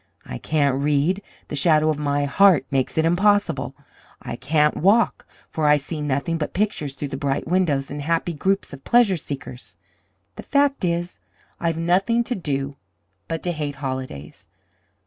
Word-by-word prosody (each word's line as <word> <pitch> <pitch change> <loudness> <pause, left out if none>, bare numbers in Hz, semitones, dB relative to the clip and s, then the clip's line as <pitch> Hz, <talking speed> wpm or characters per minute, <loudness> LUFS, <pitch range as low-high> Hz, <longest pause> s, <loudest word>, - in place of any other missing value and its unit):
I 60 - -6
can't 140 -3 +1
read 150 +7 +1 0.3
the - - -4
shadow 155 +1 +3
of 155 -1 -1
my 145 -1 0
heart 170 -1 +5
makes 135 +1 0
it 160 - +3
impossible. 205 +4 +2 0.4
I - - -6
can't 150 +2 +2
walk 205 +5 +2 0.2
for 155 -2 0
I 150 0 +6
see 150 +2 -5
nothing 150 +4 -1
but 150 - -4
pictures 180 -9 -1
through 145 - -5
the 135 - -4
bright 140 -1 -1
windows, 155 -7 +1
and 145 0 -4
happy 165 +3 0
groups 190 +2 -1
of 135 -1 -10
pleasure 235 -5 +4
seekers. 135 -5 -6 0.6
The - - -5
fact 280 -3 +1
is, 175 0 -1 0.4
I've 165 -1 -1
nothing 190 +8 +2
to 245 - -3
do 140 - -3 0.5
but 165 -1 -4
to 180 - 0
hate 150 -3 -4
holidays. 130 - -6
155 Hz, 165 wpm, -23 LUFS, 140-180 Hz, 0.6 s, I